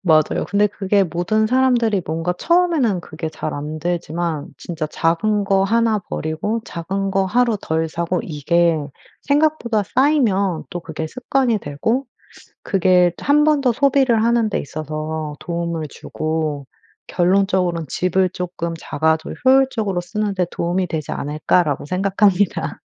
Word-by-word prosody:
맞아요. 155 -4 +2
근데 205 +1 +3
그게 200 0 +1
모든 175 +6 0
사람들이 240 -5 +2
뭔가 165 +3 -1
처음에는 330 - +2
그게 160 0 -6
잘 155 - -5
안 150 +2 -5
되지만 170 -2 -2
진짜 165 -3 -4
작은 200 +7 0
거 195 -1 +2
1 225 +1 +2
버리고 185 +6 -3
작은 195 +4 -3
거 195 0 +1
하루 235 +2 +2
덜 160 +1 -1
사고 170 +2 -2
이게 170 +2 +1 0.4
생각보다 285 -7 +1
쌓이면 205 - +1
또 175 -2 -4
그게 160 -1 -5
습관이 250 +2 0
되고 220 - -2 0.6
그게 180 -2 +3
또 - - -10
1 295 +1 +4
번 305 -1 +3
더 250 -3 +2
소비를 265 -4 +3
하는 235 -2 +2
데 - - -1
있어서 155 +1 -5
도움을 170 -2 -3
주고 155 -1 -3 0.4
결론적으론 180 -2 +1
'집을 185 +1 +1
쪼끔 175 -2 -4
작아도 160 +1 -1
효율적으로 255 -8 +3
쓰는 205 +3 -2
데 180 -1 +1
도움이 180 +2 -1
되지 155 -3 -4
않을까.'라고 150 +1 0
생각합니다. 195 +2 +1
185 Hz, 295 characters per minute, -20 LUFS, 160-220 Hz, 0.6 s, 1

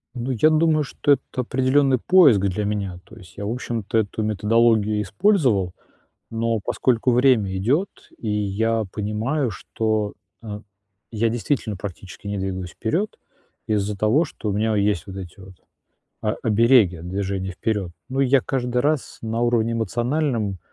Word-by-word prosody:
Ну, 125 +2 -3
я 130 +6 +4
думаю, 155 -1 +3
что 145 +1 -1
это 130 -1 +1
определённый 130 +1 +2
поиск 155 - +6
для 100 +2 -1
меня. 100 -4 -3
То - - -15
есть 90 -1 -15
я, 100 - -4
в 105 - -2
общем-то, 115 -3 -3
эту 110 0 -1
методологию 110 0 +2
использовал. 105 - +2 0.6
Но 115 0 0
поскольку 125 +3 +1
время 120 -6 +3
идёт, 140 - +1 0.3
и 115 - -7
я 105 +2 0
понимаю, 115 +6 -1
что, 110 +1 -2 0.3
э, 105 -2 -6 0.5
я 115 +1 +1
действительно 115 -1 -1
практически 95 +1 -8
не 100 0 -2
двигаюсь 95 -2 -4
вперёд 180 - -1 0.5
из-за 105 -1 -1
того, 110 - +3
что 110 -7 -6
у - - -1
меня 110 +2 +1
есть 100 -2 0
вот 95 - -8
эти 95 -2 -9
вот 95 0 -12 0.7
о 105 - 0
обереги 110 -4 +4
от 85 +2 -9
движения 95 0 -3
вперёд. 100 -1 -2 0.2
Ну, 135 +1 -1
и 135 - +3
я 135 +1 +4
каждый 125 -1 -2
раз 150 +1 -1
на 115 +1 -2
уровне 115 -1 +2
эмоциональном 115 - -1
110 Hz, 155 wpm, -22 LUFS, 100-125 Hz, 0.7 s, поиск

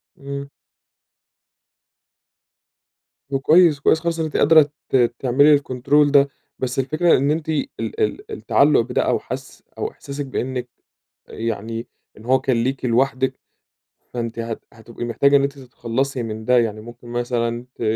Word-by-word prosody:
امم. 140 0 -6 2.8
طب 135 - 0
كويس، 160 +1 +5
كويس 160 +3 +3
خالص 165 0 -2
إن 160 - 0
أنتِ 155 - -3
قادرة 155 -1 +6 0.2
ت - - 0 0.2
تعملي 140 +4 +4
الكنترول 140 +1 +2
ده، 140 -1 +5 0.3
بس 130 0 -2
الفكرة 155 +6 +3
إن 140 +3 +1
أنتِ 160 0 -2
ال 160 - 0
ال 430 0 -3
التعلق 425 - +3
بده - - -1
أو - - +1
حس - - -8
أو 435 - -3
إحساسِك 145 - -7
بأنِك 130 -1 -4 0.6
يعني 115 +1 -4 0.3
إن 110 - -14
هو 130 +2 +3
كان 125 -4 +1
ليكِ 130 +1 -2
لوحدِك، 130 +2 +1 0.8
فأنتِ 115 -1 -4
هت 115 -1 -4
هتبقي 115 +1 -9
محتاجة 140 +4 +3
إن 140 - +3
أنتِ 140 0 -2
تتخلصي 130 +1 -3
من 110 -1 -6
ده 125 +2 +4
يعني 110 -2 0
ممكن 120 +2 -12
مثلًا 120 0 -2
ت - - -9
130 Hz, 145 wpm, -21 LUFS, 120-145 Hz, 2.8 s, قادرة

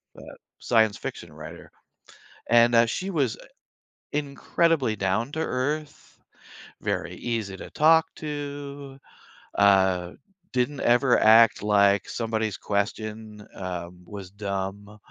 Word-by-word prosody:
the - - -12 0.2
science 110 -3 +2
fiction - - -7
writer, - - -11 0.8
and, 120 0 +5
uh, 115 0 +6
she 185 +11 -3
was, 140 - 0
uh, - - -15 0.7
incredibly 145 -2 0
down-to-earth, 130 +8 -3 0.6
very - - -2
easy 110 -5 -3
to - - -9
talk 160 +1 +5
to, 145 -2 -6 0.6
uh, 95 -3 +3 0.4
didn't 130 +3 0
ever 120 +1 +4
act 110 +1 +6
like 100 -1 +3
somebody's 110 -3 -2
question, 105 +1 -4
um, 90 -1 -6
was 100 -3 -9
dumb, 100 +1 -5
110 Hz, 105 wpm, -25 LUFS, 100-140 Hz, 0.8 s, uh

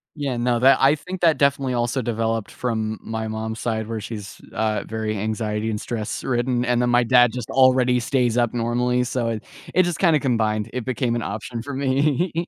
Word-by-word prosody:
Yeah, 140 -4 -2
no, 120 0 +1
that 135 +2 +5
I 140 +2 +5
think 180 +5 -8
that 165 -3 +4
definitely 140 -2 +1
also 120 +2 0
developed 115 -2 -1
from 110 -3 -3
my 110 0 -4
mom's 110 0 -4
side, 110 -2 -2
where 115 -1 -4
she's, 105 -2 -8
uh, 110 -1 0
very 110 -1 -3
anxiety 110 +1 -2
and 105 -1 -2
stress 110 -2 -4
ridden, 125 -1 0
and 120 0 +2
then 120 - +1
my 120 0 +4
dad 120 -1 +5
just 125 -3 -5
already 130 -1 +4
stays 120 -1 +1
up 120 0 +2
normally, 125 +1 +1
so 125 -1 -2
it 110 -1 -4 0.3
it 185 - +6
just 175 -2 -2
kinda 165 -5 +4
combined, 110 -5 0
it 125 -2 -4
became 125 -2 -1
an 120 - -1
option 115 +2 -5
for 140 +4 -7
me. 140 +5 +1
120 Hz, 200 wpm, -22 LUFS, 110-130 Hz, 0.3 s, it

